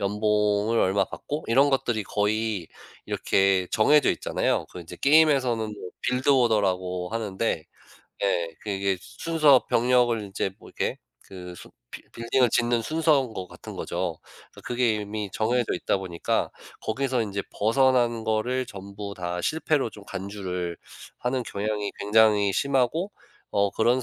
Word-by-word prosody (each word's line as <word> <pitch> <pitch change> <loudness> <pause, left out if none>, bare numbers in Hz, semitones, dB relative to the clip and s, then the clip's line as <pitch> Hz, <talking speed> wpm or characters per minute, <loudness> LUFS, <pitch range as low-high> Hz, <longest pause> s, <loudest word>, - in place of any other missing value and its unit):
연봉을 105 +2 +1
얼마 95 +1 +2
받고, 150 +10 -6
이런 135 +5 +4
것들이 120 -5 0
거의 105 -2 -1 0.4
이렇게 95 -1 +2
정해져 145 +7 +4
있잖아요. - - -1
그 90 - -8
인제 80 - -10
게임에서는 140 -6 +4
뭐 95 -3 -8
빌드 125 +2 0
오더라고 95 -8 +2
하는데 110 -6 -2 0.6
예 85 -4 +1
그게 100 -2 -1
순서 155 - +3
병력을 120 -1 +3
인제 100 -1 -3
뭐 - - -14
이렇게 - - -3 0.2
그 90 -2 -10
순 - - -13 0.2
빌 - - -10
빌딩을 115 +1 +1
짓는 120 0 +2
순서인 150 -5 +2
것 95 -3 -5
같은 - - -10
거죠. - - -3 0.3
그 - - -14
그게 120 -3 0
이미 105 -1 -4
정해져 120 +2 0
있다 90 - 0
보니까 90 -3 -2 0.3
거기서 130 +1 0
인제 100 -2 -3
벗어난 120 0 +2
거를 120 +4 0
전부 100 -1 -8
다 90 -1 -3
실패로 155 - 0
좀 105 -2 -13
간주를 90 -4 -5 0.4
하는 125 0 -1
경향이 105 -1 -3
굉장히 105 -1 +4
심하고, 140 - +1 0.4
어 100 0 +2
그런 120 +3 +2
110 Hz, 295 characters per minute, -26 LUFS, 100-125 Hz, 0.6 s, 이런